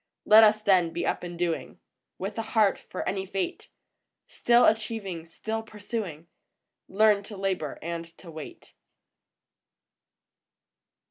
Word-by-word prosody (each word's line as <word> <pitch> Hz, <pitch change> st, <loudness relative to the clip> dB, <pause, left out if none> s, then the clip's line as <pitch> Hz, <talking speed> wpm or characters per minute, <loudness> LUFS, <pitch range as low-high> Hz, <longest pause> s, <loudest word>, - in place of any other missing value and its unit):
Let 215 Hz, +1 st, +8 dB
us, 215 Hz, 0 st, +4 dB
then, 185 Hz, -5 st, +4 dB
be 170 Hz, -, -3 dB
up -, -, -1 dB
and 175 Hz, -1 st, -7 dB
doing, 170 Hz, -1 st, -3 dB, 0.4 s
With 195 Hz, +2 st, -5 dB
a -, -, +1 dB
heart 220 Hz, -2 st, +2 dB
for 185 Hz, -, -6 dB
any 190 Hz, 0 st, -2 dB
fate; 195 Hz, 0 st, -4 dB, 0.6 s
Still 240 Hz, 0 st, +3 dB
achieving, 215 Hz, -6 st, -1 dB
still 220 Hz, +6 st, -4 dB
pursuing, 210 Hz, -7 st, -6 dB, 0.6 s
Learn 210 Hz, 0 st, +4 dB
to 205 Hz, 0 st, -10 dB
labor 190 Hz, -6 st, -2 dB
and 170 Hz, 0 st, -4 dB
to 170 Hz, -, -12 dB
wait. 155 Hz, -2 st, -10 dB
195 Hz, 125 wpm, -27 LUFS, 175-215 Hz, 0.6 s, Let